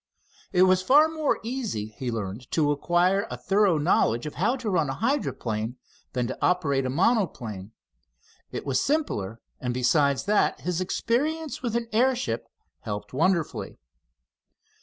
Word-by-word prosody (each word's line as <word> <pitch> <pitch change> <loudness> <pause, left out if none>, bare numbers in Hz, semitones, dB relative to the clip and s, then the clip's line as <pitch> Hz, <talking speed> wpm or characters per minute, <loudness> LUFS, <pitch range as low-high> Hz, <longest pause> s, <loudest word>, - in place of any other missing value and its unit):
It 185 -1 +5
was 185 0 +4
far 290 +10 +6
more 315 -2 0
easy, 225 - -3
he 130 - -7
had 120 - -1
learned, 110 +3 -5
to 150 -3 +3
acquire 175 +7 +2
a - - -5
thorough 195 -3 +2
knowledge, 145 -6 +2
of 150 - -5
how 215 - +1
to 250 -4 -6
run 160 -6 +1
a 135 - -2
hydroplane 125 - -2 0.4
than 125 -2 0
to - - -4
operate 140 -7 +1
a - - -2
monoplane. 130 - 0 0.8
It - - -5
was 135 -2 +1
simpler, 115 - -1 0.2
and 125 -1 -3
besides 140 +2 +2
that 210 0 +1
his 180 0 -1
experience 295 - -1
with 235 -3 -2
an 235 -1 -1
airship 240 - +1 0.3
helped 105 +1 -6
wonderfully. 165 +3 0
175 Hz, 150 wpm, -26 LUFS, -, 0.8 s, far